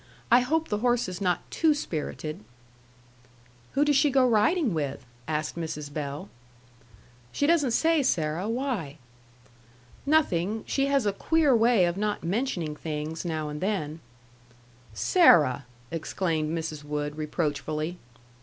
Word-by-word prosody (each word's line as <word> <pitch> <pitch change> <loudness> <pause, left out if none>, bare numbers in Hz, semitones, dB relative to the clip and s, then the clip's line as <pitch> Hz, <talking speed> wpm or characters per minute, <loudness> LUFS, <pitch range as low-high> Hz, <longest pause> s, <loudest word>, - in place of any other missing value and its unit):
"I 240 - +8
hope 320 +6 0
the 210 - -1
horse 240 -1 +1
is 185 +1 -6
not 180 -3 +1
too 315 -2 +3
spirited." 155 - -4 1.3
"Who 285 +2 +3
does 295 -1 +3
she 285 +2 +4
go 260 -1 +4
riding 240 - +2
with?" 140 -5 -3 0.2
asked 155 0 -2
Mrs. 150 -3 -5
Bell. 145 +4 -4 1.0
"She 285 - 0
doesn't 305 -4 +3
say, 320 +6 +3
Sarah. 170 - 0
Why?" 230 - -2 1.1
"Nothing. 220 - +2
She 275 0 0
has 275 -4 +2
a 205 - +1
queer 305 +3 +3
way 225 -4 +4
of 175 +1 -1
not 210 0 -2
mentioning 175 - -2
things, 155 +1 -4
now 155 -2 -2
and 150 0 -6
then." 165 -6 -2 1.0
"Sarah!" 150 - +4 0.2
exclaimed 165 -1 -2
Mrs. 160 -2 -4
Wood, 145 0 -3
reproachfully. 155 +1 -3
180 Hz, 130 wpm, -27 LUFS, 155-250 Hz, 1.3 s, I